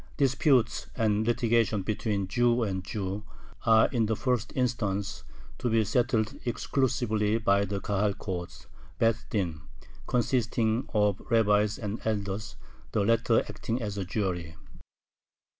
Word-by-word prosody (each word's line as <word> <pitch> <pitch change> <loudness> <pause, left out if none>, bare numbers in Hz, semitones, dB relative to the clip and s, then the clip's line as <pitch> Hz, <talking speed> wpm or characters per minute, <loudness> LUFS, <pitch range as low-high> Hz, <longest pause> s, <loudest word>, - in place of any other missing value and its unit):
Disputes 135 -3 +2
and 110 0 +1
litigation 115 -3 +2
between 105 -1 -1
Jew 120 +3 +2
and 95 -3 -2
Jew 95 +1 -4 0.4
are 110 0 +6
in 115 -5 +1
the 110 - +1
first 125 0 -1
instance 105 -6 -1 0.4
to 125 - 0
be 115 -1 +3
settled 110 0 0
exclusively 115 -4 0
by 100 -2 +2
the 100 0 -3
Kahal 100 0 0
court 90 -4 -6 0.3
(beth 115 -1 +1
din), 85 -7 -2 0.5
consisting 120 -1 0
of 105 -2 +2
rabbis 105 -2 +3
and 105 0 -4
elders, 100 -1 -2 0.4
the 100 - +2
latter 115 +1 +3
acting 115 +2 -4
as 105 -4 -4
a 100 - -2
jury. 90 -4 -3
110 Hz, 125 wpm, -28 LUFS, 100-115 Hz, 0.5 s, are